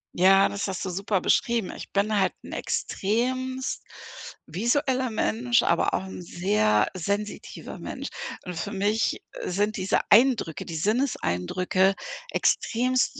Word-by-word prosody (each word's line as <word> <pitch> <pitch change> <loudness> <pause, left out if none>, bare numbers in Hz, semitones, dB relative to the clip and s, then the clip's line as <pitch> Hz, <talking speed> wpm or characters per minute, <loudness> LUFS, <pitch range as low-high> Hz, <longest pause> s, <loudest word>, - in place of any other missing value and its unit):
Ja, 195 +2 +6
das 200 0 -3
hast 190 -2 -3
du - - -2
super 195 +1 -1
beschrieben. 235 0 +1
Ich - - -9
bin 205 +2 +1
halt 190 - +2
'n - - -10
extremst 255 +5 -1 0.6
visueller 255 - 0
Mensch, 240 +2 +2
aber 170 - +2
auch - - +1
'n 190 -1 -8
sehr 175 - +2
sensitiver 200 +4 -4
Mensch. - - -6 0.4
Und 180 - -6
für 170 +5 -4
mich, 205 +2 +1 0.2
äh, - - -6
sind 205 +4 0
diese 185 - +1
Eindrücke, 225 - +4
die 165 - -6
Sinneseindrücke 185 - +1 0.4
extremst 255 +3 +1
205 Hz, 130 wpm, -26 LUFS, 185-240 Hz, 0.6 s, Ja